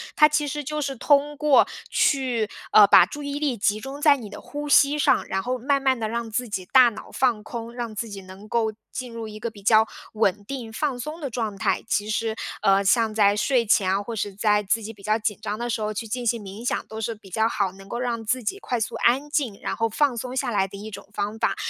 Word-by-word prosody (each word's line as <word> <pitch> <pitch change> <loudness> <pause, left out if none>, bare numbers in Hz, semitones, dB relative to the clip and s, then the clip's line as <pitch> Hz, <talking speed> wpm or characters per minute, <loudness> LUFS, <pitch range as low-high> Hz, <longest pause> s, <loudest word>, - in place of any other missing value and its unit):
它 300 - +7
其 300 0 0
实 295 +1 -3
就 300 +2 -3
是 275 -1 -2
通 290 +3 +2
过 295 -2 +5 0.2
去 255 -6 +1 0.2
呃， 210 - +9
把 175 - +8
注 290 +10 -8
意 285 0 -3
力 285 -5 0
集 210 +1 +1
中 270 +5 -7
在 295 -2 +6
你 225 -5 -9
的 205 - -9
呼 295 0 -6
吸 285 +1 +5
上， - - +3
然 190 - -1
后 250 +4 -2
慢 275 +3 +1
慢 265 -2 +2
地 220 - -1
让 230 +1 -3
自 245 +3 -1
己 190 -4 -4
大 255 -2 +7
脑 215 -1 -11
放 240 -5 +1
空， 235 0 -7
让 240 -2 -5
自 230 +3 -3
己 200 -1 -8
能 190 +2 -13
够 220 0 0 0.2
进 250 -2 -6
入 230 -1 -6
一 215 0 -9
个 235 - -3
比 205 -3 -15
较 220 +1 +5 0.3
稳 205 -2 +1
定、 245 -2 -6
放 275 +2 -2
松 305 +6 -6
的 285 -4 -4
状 220 -4 -3
态。 - - 0
其 210 -1 0
实， 220 +1 -1 0.3
呃， 195 0 +4
像 225 +2 +3
在 205 -2 +4
睡 240 +2 +2
前 200 -3 +3
啊， 195 +1 +1
或 230 +2 -6
是 205 -1 -3
在 210 0 +2
自 225 +3 0
己 220 +2 -6
比 205 - -18
较 215 +2 +2
紧 210 -2 -2
张 210 - -3
的 240 0 -3
时 225 - -2
候， 215 0 -2
去 225 +2 -5
进 245 +3 -4
行 235 -1 0
冥 200 +4 -9
想， - - -1
都 220 0 -7
是 225 +1 -3
比 210 -2 -16
较 220 +4 +1
好， 200 -4 -1
能 195 0 -14
够 235 - -4
让 240 -2 -2
自 250 +3 -1
己 390 - -3
快 245 - -2
速 220 - -3
安 270 +5 +2
静， 270 -9 -1
然 - - -3
后 225 0 0
放 275 +3 +1
松 250 +2 -5
下 245 - -1
来 195 -3 +1
的 200 - -10
一 210 +2 -8
种 205 - -10
方 210 +2 -3
法。 - - +1
230 Hz, 280 characters per minute, -24 LUFS, 210-260 Hz, 0.3 s, 呃